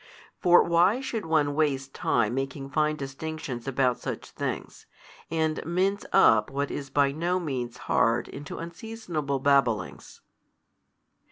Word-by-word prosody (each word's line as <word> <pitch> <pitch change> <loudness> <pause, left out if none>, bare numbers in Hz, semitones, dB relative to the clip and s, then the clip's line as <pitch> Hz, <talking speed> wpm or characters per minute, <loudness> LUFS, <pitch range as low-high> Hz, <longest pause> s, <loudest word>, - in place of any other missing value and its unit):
For 175 -2 +6
why 175 +7 +3
should 230 -8 -4
one 150 -3 +2
waste 135 -3 0
time 120 -2 +1
making 135 +1 -4
fine 155 +2 +1
distinctions 135 -2 -6
about 130 -2 +1
such - - -6
things, - - -5 0.4
and 160 -1 -1
mince 185 +5 0
up 110 -1 +5
what 140 +1 -2
is 140 -2 -5
by 140 0 +3
no 170 +5 0
means 130 -8 -4
hard 115 +1 +2
into 145 0 -8
unseasonable 170 -5 -4
babblings? 135 -5 0
145 Hz, 125 wpm, -27 LUFS, 135-170 Hz, 0.4 s, For